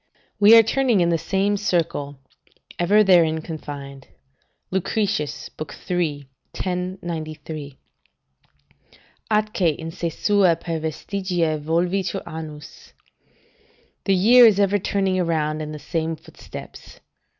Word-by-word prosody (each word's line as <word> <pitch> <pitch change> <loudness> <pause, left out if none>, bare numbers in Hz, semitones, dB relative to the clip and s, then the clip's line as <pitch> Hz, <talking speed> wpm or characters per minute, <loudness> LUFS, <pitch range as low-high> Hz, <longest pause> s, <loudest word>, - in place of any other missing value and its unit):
["We 210 +3 +8
are 225 - +8
turning 240 -1 +2
in 170 -1 +3
the 165 -1 +1
same 200 +4 0
circle, 160 -7 -1 0.6
ever 205 +5 +4
therein 170 -5 +4
confined." 140 -4 -8 0.6
Lucretius, 185 -6 -1 0.4
iii. 155 -5 -1 0.3
1093.] 160 -6 -5 1.5
"'Atque 215 -1 0 0.2
in 165 0 -6
se 170 +1 -3
sua 190 +1 +3
per 165 0 -4
vestigia 165 0 -2
volvitur 175 +4 -1
annus.' 155 -2 -9 1.1
["The 195 - +3
year 235 +6 +7
is 205 -3 +3
ever 200 0 +3
turning 195 -1 0
around 155 -3 -1
in 155 0 -5
the 155 - -6
same 160 +2 -3
footsteps." - - -12
170 Hz, 105 wpm, -22 LUFS, 155-195 Hz, 1.5 s, We